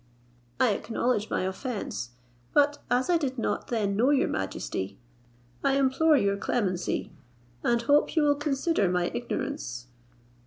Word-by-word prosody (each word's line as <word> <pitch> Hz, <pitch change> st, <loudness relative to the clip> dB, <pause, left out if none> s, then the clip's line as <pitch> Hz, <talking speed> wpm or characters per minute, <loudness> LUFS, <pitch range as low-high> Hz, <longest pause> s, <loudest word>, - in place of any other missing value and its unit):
I 250 Hz, -, +4 dB
acknowledge 225 Hz, +1 st, -1 dB
my -, -, 0 dB
offence, 190 Hz, -, -4 dB, 0.5 s
but 290 Hz, 0 st, +4 dB
as 250 Hz, +1 st, +2 dB
I 350 Hz, -, +4 dB
did 270 Hz, -5 st, -2 dB
not 230 Hz, -, -2 dB
then 210 Hz, -4 st, 0 dB
know 240 Hz, +6 st, +3 dB
your 285 Hz, -2 st, +3 dB
majesty, 95 Hz, 0 st, -3 dB, 0.7 s
I 275 Hz, -, +3 dB
implore 275 Hz, +3 st, +4 dB
your 200 Hz, -4 st, +1 dB
clemency, 195 Hz, -4 st, -1 dB, 0.5 s
and 235 Hz, 0 st, +2 dB
hope 290 Hz, +7 st, +3 dB
you 315 Hz, -, +4 dB
will 290 Hz, -1 st, +5 dB
consider 285 Hz, -, 0 dB
my 180 Hz, -1 st, 0 dB
ignorance. 240 Hz, -, -4 dB
245 Hz, 140 wpm, -28 LUFS, 200-285 Hz, 0.7 s, will